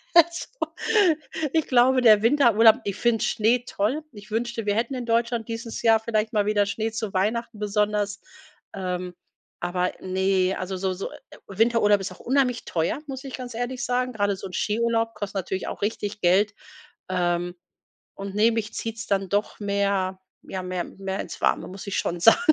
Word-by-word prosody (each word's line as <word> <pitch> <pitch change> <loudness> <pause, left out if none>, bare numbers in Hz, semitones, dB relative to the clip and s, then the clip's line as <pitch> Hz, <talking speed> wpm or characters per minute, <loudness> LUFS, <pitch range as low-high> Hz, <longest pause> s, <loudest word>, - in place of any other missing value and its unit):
Also, 340 0 +5 1.1
ich 320 -2 +2
glaube, 255 +1 +4
der 215 -4 +7
Winterurlaub 230 -3 +6
ich 200 -2 -3
find 235 0 +2
Schnee 235 +2 +2
toll. 250 +11 -1
Ich 205 -2 -13
wünschte, 230 +1 -2
wir 205 - +2
hätten 230 +4 0
in 250 -2 -4
Deutschland 230 0 +1
dieses 230 0 -5
Jahr 225 -1 +5
vielleicht 220 -1 -1
mal 210 -2 +2
wieder 205 -1 +2
Schnee 220 +2 -2
zu 220 -2 -3
Weihnachten, 225 +4 0
besonders. 210 0 0 0.6
Ähm, 180 -1 -4 0.4
aber 180 +1 -1
ne, 190 0 +1
also 185 +1 -4
so 190 0 -1
so 190 +2 -5 0.4
Winterurlaub 210 0 +3
ist 195 - -4
auch - - -12
unheimlich 255 -2 +1
teuer, 165 - -1
muss 265 -1 -6
ich 270 -2 -8
ganz 250 -2 -7
ehrlich 245 +1 -3
sagen. 250 +1 0
Grade 205 -2 +1
so 190 - -9
'n 185 - -8
Skiurlaub 230 +2 0
kostet 205 -1 -5
natürlich 190 0 -3
auch - - -6
richtig 205 0 -3
Geld, 195 +4 +3 0.6
ähm, 175 -1 0 0.6
und 195 0 -6
ne, 220 +2 +4
mich 225 -1 -3
zieht's 225 -1 -5
dann 195 -1 0
doch 205 +3 -1
mehr, 200 -2 0 0.2
ja, 190 -1 -5
mehr 180 -1 -3
mehr 195 0 -5
ins - - -6
Warme, - - +1
muss 190 +2 -9
ich 195 - -2
schon 175 0 -2
sagen. 225 - +7
210 Hz, 175 wpm, -25 LUFS, 195-230 Hz, 1.1 s, der